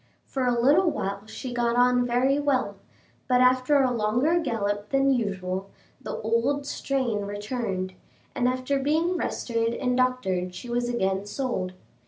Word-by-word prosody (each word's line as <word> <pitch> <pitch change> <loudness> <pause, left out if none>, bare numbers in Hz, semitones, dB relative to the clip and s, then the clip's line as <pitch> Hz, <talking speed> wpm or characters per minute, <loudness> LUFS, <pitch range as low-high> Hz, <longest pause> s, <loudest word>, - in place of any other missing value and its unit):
For 260 -2 -2
a 240 -1 +2
little 300 +9 +4
while 200 -5 -4
she 250 +3 -6
got 240 -1 +1
on 245 0 +4
very 260 +4 +2
well, 260 -8 0 0.5
but 250 -1 +3
after 255 +3 +4
a 255 - +2
longer 245 +9 +2
gallop 210 -7 -2
than 275 0 +3
usual, 195 -4 -2 0.3
the - - -5
old 230 +6 0
strain 255 -8 -1
returned, 205 -2 -3 0.4
and 245 - +1
after 255 +2 0
being 320 +6 +1
rested 230 -8 -1
and 250 -1 0
doctored 190 -9 0
she 235 +6 -7
was 240 0 0
again 195 -4 -1
sold. 205 -7 -2
245 Hz, 150 wpm, -26 LUFS, 205-265 Hz, 0.5 s, little